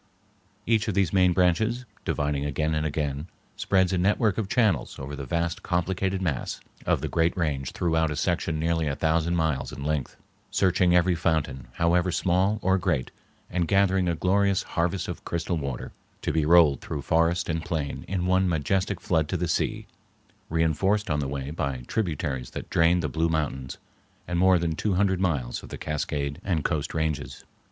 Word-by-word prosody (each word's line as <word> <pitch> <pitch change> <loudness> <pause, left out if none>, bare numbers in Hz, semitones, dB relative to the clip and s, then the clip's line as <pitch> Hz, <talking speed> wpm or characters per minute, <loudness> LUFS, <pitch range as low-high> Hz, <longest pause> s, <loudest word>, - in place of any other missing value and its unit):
Each 110 -1 +2
of 105 - -1
these 95 -3 +2
main 90 -2 +5
branches, 95 +8 +1 0.2
dividing 75 -1 -1
again 75 +2 -1
and 80 0 0
again, 75 0 -2 0.3
spreads 95 -1 +2
a 90 - +1
network 105 +3 +2
of 100 -3 -2
channels 100 - +1
over 70 +1 -6
the 70 -1 -7
vast 85 +4 -1
complicated 95 +1 -1
mass 75 -8 -2 0.3
of - - +2
the - - -2
great 85 +2 +1
range 70 -6 -1
throughout 80 -2 +1
a 75 - -3
section 85 0 0
nearly 80 -1 0
a 70 - -1
thousand 80 +2 +1
miles 80 -5 0
in 70 - -7
length, 75 -3 -2 0.3
searching 90 -1 +3
every 90 +1 +4
fountain, 75 -6 -1
however 85 +3 +2
small 95 +5 +2
or 95 +1 +3
great, 80 -9 -1 0.4
and 85 -1 -1
gathering 95 -1 +3
a 85 - 0
glorious 95 +3 +2
harvest 85 +2 -1
of - - -6
crystal 85 0 -2
water 70 -4 -4 0.3
to - - -1
be 80 -2 +1
rolled 80 -5 +6
through 70 -3 -5
forest 85 +5 +2
and 80 -1 -2
plain 80 -4 -3
in 90 -1 -1
one 95 0 +3
majestic 90 +4 0
flood 80 -3 +1
to 95 - 0
the 90 +1 -1
sea, 80 - -1 0.6
reinforced 85 +6 +1
on 75 - +1
the 70 - -1
way 70 0 -4
by 70 -6 -3
tributaries 75 - -2
that - - -8
drain 85 +2 +4
the 75 - -1
Blue 80 +4 0
Mountains 75 -5 -2 0.5
and 90 0 -1
more 95 0 +5
than 85 -2 -1
two 100 +3 0
hundred 95 -1 +2
miles 70 -10 -1
of - - -12
the - - -6
Cascade 70 -2 -3
and 85 -6 0
Coast 75 -2 -1
Ranges. 75 -5 -2
85 Hz, 180 wpm, -26 LUFS, 75-90 Hz, 0.6 s, rolled